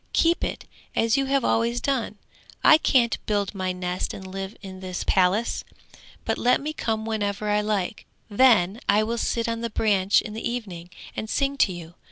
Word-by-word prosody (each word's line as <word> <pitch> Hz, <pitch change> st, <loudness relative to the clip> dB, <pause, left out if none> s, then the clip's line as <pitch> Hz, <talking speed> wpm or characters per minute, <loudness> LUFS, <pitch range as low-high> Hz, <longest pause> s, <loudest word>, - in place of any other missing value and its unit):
keep 335 Hz, +1 st, +2 dB
it -, -, -3 dB, 0.3 s
as 225 Hz, 0 st, +2 dB
you 275 Hz, -1 st, +1 dB
have 275 Hz, -1 st, +1 dB
always 235 Hz, +1 st, +1 dB
done! 245 Hz, -5 st, -1 dB, 0.5 s
I 310 Hz, -, +8 dB
can't 240 Hz, -6 st, +2 dB
build 205 Hz, -1 st, 0 dB
my 185 Hz, -2 st, -2 dB
nest 180 Hz, 0 st, -3 dB
and 190 Hz, -, -9 dB
live 195 Hz, +2 st, -6 dB
in 190 Hz, -1 st, -8 dB
this 185 Hz, -1 st, -4 dB
palace, 190 Hz, +5 st, +2 dB, 0.6 s
but -, -, -1 dB
let 250 Hz, +1 st, +3 dB
me 305 Hz, +2 st, -4 dB
come 220 Hz, -6 st, -2 dB
whenever 210 Hz, -2 st, -2 dB
I 210 Hz, 0 st, +2 dB
like, 210 Hz, 0 st, -2 dB, 0.2 s
then 210 Hz, -3 st, +4 dB
I 210 Hz, +1 st, +4 dB
will 230 Hz, +2 st, -2 dB
sit 230 Hz, +1 st, -1 dB
on 230 Hz, 0 st, -2 dB
the 235 Hz, -, -2 dB
branch 205 Hz, -3 st, +2 dB
in 215 Hz, -, -6 dB
the 220 Hz, -, -3 dB
evening, 190 Hz, -8 st, -6 dB, 0.3 s
and 215 Hz, -, -4 dB
sing 275 Hz, +2 st, 0 dB
to 200 Hz, -, +3 dB
you. 170 Hz, -1 st, -9 dB
215 Hz, 190 wpm, -25 LUFS, 190-235 Hz, 0.6 s, I